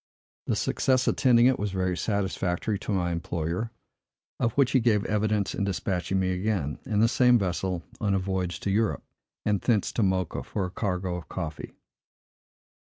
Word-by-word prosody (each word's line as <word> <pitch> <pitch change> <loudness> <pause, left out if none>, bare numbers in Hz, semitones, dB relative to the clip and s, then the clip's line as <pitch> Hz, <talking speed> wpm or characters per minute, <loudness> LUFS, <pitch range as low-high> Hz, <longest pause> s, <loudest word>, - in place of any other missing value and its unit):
The - - +1
success 130 -1 +1
attending 120 -2 +4
it 130 0 +4
was 105 0 -1
very 95 -1 0
satisfactory 100 0 -1
to 105 - -4
my 90 -3 0
employer, 85 +5 -2 0.7
of 115 -2 +2
which 140 -2 +3
he 130 - +4
gave 110 -4 +2
evidence 105 -1 0
in - - -2
despatching 95 -1 -1
me 95 -1 +1
again, 90 -6 -1
in 105 -1 +1
the 115 - +6
same 125 +1 +5
vessel, 90 -3 -2 0.2
on 100 -3 +1
a - - +3
voyage 95 -2 -2
to 100 - -1
Europe, 110 +2 +1 0.4
and 105 -2 +1
thence 110 -5 +1
to - - -1
Mocha, 95 -3 0
for 100 - -3
a 90 - -6
cargo 90 -3 -2
of 80 -5 -10
coffee. 80 -1 -5
100 Hz, 170 wpm, -27 LUFS, 90-110 Hz, 0.7 s, the